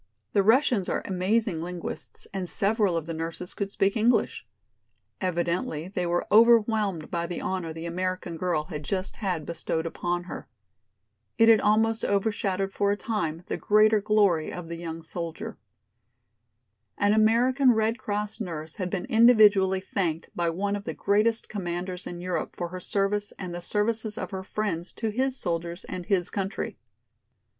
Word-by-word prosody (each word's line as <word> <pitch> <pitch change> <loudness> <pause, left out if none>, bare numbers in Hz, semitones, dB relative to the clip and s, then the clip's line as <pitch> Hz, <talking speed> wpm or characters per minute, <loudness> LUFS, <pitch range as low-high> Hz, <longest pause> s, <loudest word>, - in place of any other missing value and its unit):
The 200 - +5
Russians 225 -2 +3
are - - -1
amazing 190 -1 0
linguists 175 0 -6
and 185 -3 -3
several 205 -3 +1
of 165 - -3
the 165 - -4
nurses 165 +2 -5
could 200 -1 -3
speak 195 0 +1
English. 235 +2 +1 0.7
Evidently 170 -2 -1
they 180 -3 -2
were 175 0 0
overwhelmed 215 -6 +4
by 170 -1 -1
the 175 - -4
honor 185 -3 -3
the 160 +1 -7
American 180 0 -3
girl 165 -2 0
had 150 -2 -6
just 185 +5 -3
had 180 -8 -2
bestowed 165 0 -2
upon 175 +1 -2
her. 175 - -8 0.9
It 225 0 +6
had 220 -2 +7
almost 220 +1 +2
overshadowed 195 -1 0
for 200 0 +2
the - - -15
time 170 -8 -2
the - - -3
greater 215 0 +4
glory 200 -6 +2
of 175 -2 -7
the 170 - -5
young 165 -1 -6
soldier. 165 0 -6 1.4
An 205 +1 +3
American 245 +5 +4
Red 220 0 +1
Cross 210 0 -3
nurse 160 -5 -6
had 185 -2 -2
been 180 -1 -3
individually 215 -6 +5
thanked 170 -4 -2
by 170 -1 +1
one 200 +5 -1
of 205 0 -6
the - - -4
greatest 215 +3 +1
commanders 180 -2 -4
in 175 0 -6
Europe 180 0 -3
for 175 -1 -3
her 185 +1 -6
service 205 +2 0
and 180 -2 -6
the 175 - -5
services 215 +3 -1
of 245 - -4
her 190 -1 -4
friends 185 -4 -3
to 220 -2 -2
his 260 +4 0
soldiers 170 -1 -3
and 180 -1 -6
his 185 -4 +1
country. 195 0 -3
190 Hz, 165 wpm, -27 LUFS, 175-215 Hz, 1.4 s, had